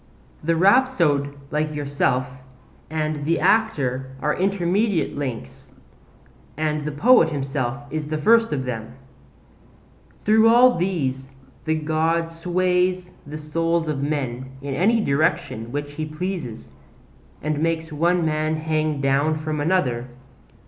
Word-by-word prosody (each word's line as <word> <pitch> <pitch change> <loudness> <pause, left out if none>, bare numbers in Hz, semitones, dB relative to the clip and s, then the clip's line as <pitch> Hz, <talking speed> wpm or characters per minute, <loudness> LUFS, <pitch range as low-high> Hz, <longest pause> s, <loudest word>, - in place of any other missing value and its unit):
The 165 +2 +1
rhapsode 170 - +3
like 150 0 -1
yourself 140 -3 0 0.6
and 155 -1 -2
the 165 +3 +1
actor 135 - +1
are 150 +2 0
intermediate 195 +1 0
links, 125 - -6 0.9
and 155 -1 -1
the 150 - -2
poet 220 - +5
himself 135 -2 -3
is 155 -1 -3
the 155 0 -2
first 225 +8 +4
of 130 -3 -2
them. 115 -1 -5 1.3
Through 220 +1 +5
all 245 +2 +6
these 140 -8 -2 0.4
the 160 0 +1
God 160 +2 0
sways 180 +1 0 0.2
the 150 +1 -6
souls 165 +2 -1
of 150 -3 -2
men 130 -3 -3
in 140 -1 -3
any 220 +10 +2
direction 145 - 0
which 145 +1 -4
he 155 +1 -4
pleases, 155 - -5 0.7
and 155 0 -1
makes 160 -1 -1
one 170 +3 +2
man 155 0 0
hang 155 -2 -1
down 140 +3 +2
from 155 -1 -3
another. 135 -8 0
155 Hz, 125 wpm, -22 LUFS, 140-175 Hz, 1.3 s, all